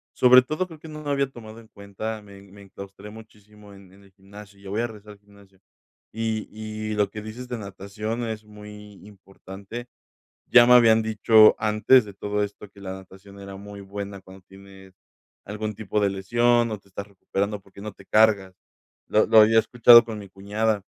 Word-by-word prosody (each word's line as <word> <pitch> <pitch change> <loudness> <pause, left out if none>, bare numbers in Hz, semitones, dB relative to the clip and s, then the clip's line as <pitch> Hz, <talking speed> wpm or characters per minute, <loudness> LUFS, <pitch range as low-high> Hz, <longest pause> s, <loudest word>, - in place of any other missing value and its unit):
sobre 125 0 +7
todo 155 +8 -4
creo 160 -3 -13
que 160 - -13
no 155 0 -9
lo 145 - -5
había 140 -1 0
tomado 115 -3 -12
en 115 - -17
cuenta, 105 +2 -7
me 100 -1 -15
me 100 +1 -17
enclaustré 100 +1 -12
muchísimo 105 -2 -16
en 95 -2 -17
en 100 +1 -20
el 100 - -22
gimnasio 100 +1 -15
ya 100 - -12
voy 105 +4 -2
a 120 - -1
regresar 105 -1 -13
al 100 - -21
gimnasio. 100 -2 -22 0.5
Y 110 -1 -3
y 110 0 -6
lo 105 -2 +1
que 105 - -7
dices 115 +4 -9
de 120 - -4
natación 105 +4 -6
es 110 -1 -6
muy 105 0 -13
importante, 100 +3 -11 0.6
ya 120 -1 +6
me 125 - +6
habían 115 -2 +5
dicho 110 0 +5
antes 110 +4 +3
de 100 -2 -12
todo 105 +1 -3
esto 100 0 -10
que 100 - -18
la 95 -1 -7
natación 95 +1 -13
era 100 0 -10
muy 100 +1 -11
buena 100 0 -8
cuando 95 0 -16
tienes 95 -1 -16 0.5
algún 105 +1 -5
tipo 105 0 -3
de 100 -1 +1
lesión, 120 +5 +1
o 105 - -5
te 100 - -27
estás 100 +1 -8
recuperando, 100 +1 -4
porque 100 0 -17
no 105 0 -7
te 95 - -18
cargas. 105 -4 +2 0.5
Lo 110 - +2
lo 110 - +6
había 110 +1 +5
escuchado 120 0 +6
con 110 -1 -7
mi 100 -1 -11
cuñada, 105 +2 -2
105 Hz, 195 wpm, -24 LUFS, 100-110 Hz, 0.6 s, sobre